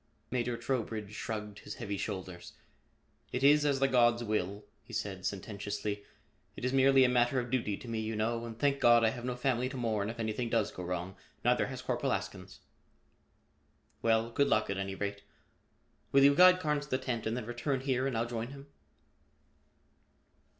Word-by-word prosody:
Major 120 -1 -1
Trowbridge 115 -4 -3
shrugged 105 -1 -5
his - - -8
heavy 105 -4 -4
shoulders. 95 -2 -6 0.8
"It 125 - -2
is 145 +1 +6
as 140 -2 +1
the 135 - +4
gods 120 -2 +3
will," 105 -2 -2 0.2
he - - -14
said 95 -2 -3
sententiously. 100 +1 -4 0.5
"It - - -5
is 125 - 0
merely 135 0 +6
a - - +6
matter 125 +1 +2
of 120 -1 -5
duty 110 -6 0
to - - -11
me, 115 -1 -2
you 110 0 -3
know, 115 +2 -1
and 115 -1 -7
thank 140 +1 +1
God, 120 -2 +6
I 110 - +5
have 120 +2 -6
no 125 -1 -2
family 125 -1 0
to 135 - -6
mourn 110 -4 -1
if 115 - -7
anything 115 +2 -2
does 115 -3 +1
go - - -8
wrong. 90 +1 -4 0.3
Neither - - +3
has - - -7
Corporal - - 0
Askins." - - -6 1.4
"Well, 115 0 +2
good 140 +4 +2
luck 110 -5 +2
at 100 - -2
any 95 0 -3
rate. 100 0 -4 0.9
Will 135 0 +6
you 140 +1 +7
guide 180 +4 +7
Carnes 150 -3 -1
to - - -19
the 130 - +1
tent 125 -4 -3
and 115 +2 -1
then 125 - -4
return 120 +3 -2
here 130 -1 0
and 130 -4 -2
I'll 115 - +1
join 115 -1 -4
him?" 140 +1 -10
115 Hz, 190 wpm, -32 LUFS, 105-130 Hz, 1.4 s, you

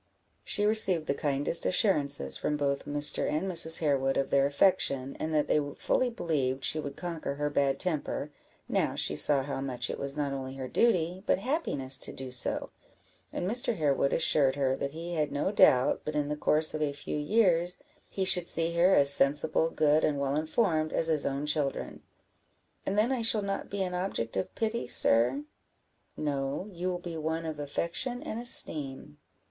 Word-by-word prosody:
She 205 - -1
received 195 -7 +4
the 140 - -1
kindest 145 +3 +2
assurances 150 -7 +1
from 150 - -2
both 140 -1 -2
Mr. 145 0 +3
and 155 +3 -2
Mrs. 165 -3 +4
Harewood 135 -3 0
of 135 - -2
their 140 0 +3
affection, 140 -4 0
and 160 - -3
that 150 -1 0
they - - +2 0.2
fully 255 - 0
believed 140 - -3
she 155 - 0
would 140 -2 -6
conquer 165 -5 -5
her 145 0 -3
bad 140 -1 0
temper, 155 -4 -3 0.4
now - - -1
she - - 0
saw 140 -2 +2
how 140 -1 -5
much 125 -3 -3
it - - -7
was 140 +1 -4
not 145 -2 -2
only 135 -1 -6
her 130 -1 -6
duty, 180 - 0
but - - +2
happiness 185 - -2
to - - -3
do 130 -1 -8
so; 125 - +1 0.6
and 180 - -4
Mr. 240 +2 -1
Harewood 140 -3 0
assured 145 -4 +2
her 135 -2 0
that 140 - -4
he 165 +4 -7
had 155 -3 -2
no 145 +7 -2
doubt, 130 -10 +3
but 150 - -5
in 145 -1 -1
the 150 - -2
course 155 +1 +1
of 155 - -4
a 145 -2 -1
few 145 +1 -5
years, 175 0 +1 0.3
he 190 - -3
should 180 -2 +4
see 165 0 -1
her 180 +3 +4
as 140 0 +8
sensible, 150 +4 +3
good, 155 -1 +1
and 145 - 0
well 140 0 -1
informed, 155 0 -1
as 165 - +1
his 155 -3 +1
own 140 +2 -3
children. 150 -2 -3 0.9
"And 200 - -2
then 220 +5 +2
I 255 -3 -1
shall 225 -2 +1
not 195 0 -4
be 200 -1 -3
an 180 -1 -5
object 180 -11 -3
of 95 - -4
pity, 225 +1 -3
sir?" 125 +5 +3 0.7
"No, 140 +3 -3
you 180 0 -5
will 180 - -3
be 175 -2 -8
one 160 +1 -3
of 155 -2 -6
affection 170 - -3
and 220 - -6
esteem." 140 - +1
150 Hz, 190 wpm, -28 LUFS, 140-180 Hz, 0.9 s, as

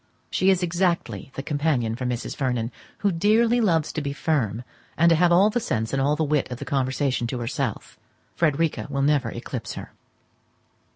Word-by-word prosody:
She 190 - +2
is 190 -1 +3
exactly 170 - -1
the 135 - -4
companion 145 -7 0
for 125 +1 -3
Mrs. 120 -1 -3
Vernon, 125 -4 -1 0.3
who 200 - +4
dearly 225 +7 +3
loves 165 -7 +2
to 155 - -2
be 140 -1 -3
firm, 125 -8 -1 0.3
and 170 +1 +5
to - - +6
have 175 +2 +3
all 195 +5 +5
the 240 - +1
sense 115 - -2
and 135 - +1
all 145 +2 +2
the 160 - 0
wit 150 -2 0
of 125 - -4
the - - -7
conversation 130 -2 0
to 125 - -3
herself: 120 -1 -4 0.4
Frederica 160 0 +1
will 140 -1 -1
never 140 -4 +2
eclipse 120 -1 -6
her. - - -8
145 Hz, 185 wpm, -24 LUFS, 125-170 Hz, 0.4 s, to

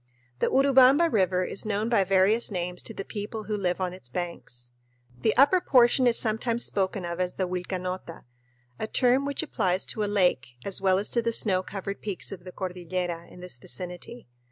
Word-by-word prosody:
The - - +2
Urubamba 275 +4 +5
River 185 -3 +2
is 190 - 0
known 215 +1 -1
by 230 -4 +3
various 195 +4 +3
names 180 -2 -3
to 225 - -6
the 195 - -5
people 215 +1 -5
who 210 0 -3
live 185 -3 -1
on 180 -1 -2
its 185 -10 -13
banks. 125 -6 -6 0.5
The 215 - +1
upper 290 +8 +5
portion 250 -1 +4
is 235 - +4
sometimes 230 +1 +1
spoken 190 -1 -1
of 170 +1 -5
as 180 0 -1
the 185 - -1
Vilcanota, 180 -1 -5 0.6
a 220 - -2
term 255 +4 +2
which 285 +2 -2
applies 185 - 0
to 215 - -3
a 205 - -1
lake 175 -12 +1
as 195 -1 -1
well 190 -1 +3
as 200 - -1
to 235 - +2
the 230 0 0
snow 195 -5 +1
covered 195 +1 -6
peaks 200 -4 -4
of 185 -2 -9
the 185 - -8
cordillera 180 -2 -4
in 180 - -13
this 180 -8 -5
vicinity. 180 - -6
195 Hz, 195 wpm, -27 LUFS, 180-225 Hz, 0.6 s, Urubamba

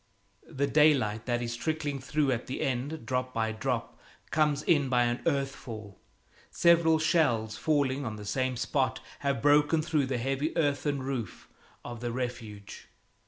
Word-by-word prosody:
The 140 -3 -1
daylight 135 -8 +3
that 120 -1 0
is 120 0 -3
trickling 150 0 -2
through 140 +2 0
at 120 -1 -2
the 130 - -4
end, 135 +2 -2
drop 125 +1 -2
by 110 -1 0
drop, 115 +1 -3 0.3
comes 150 -1 +2
in 145 -5 +2
by 125 -1 +3
an 120 0 -1
earth 140 -3 +1
fall. 110 -5 -9 0.5
Several 170 -2 +4
shells, 145 -10 +1
falling 145 -3 0
on 110 -4 -4
the 105 -1 -9
same 130 +4 -1
spot, 130 +1 0 0.2
have 140 -4 -1
broken 150 +2 +4
through 150 -4 +1
the 130 -1 -1
heavy 135 +7 -2
earthen 145 -2 0
roof 130 -7 -5 0.4
of 120 -1 -6
the 120 0 -3
Refuge. 115 -5 -6
130 Hz, 160 wpm, -29 LUFS, 120-150 Hz, 0.5 s, Several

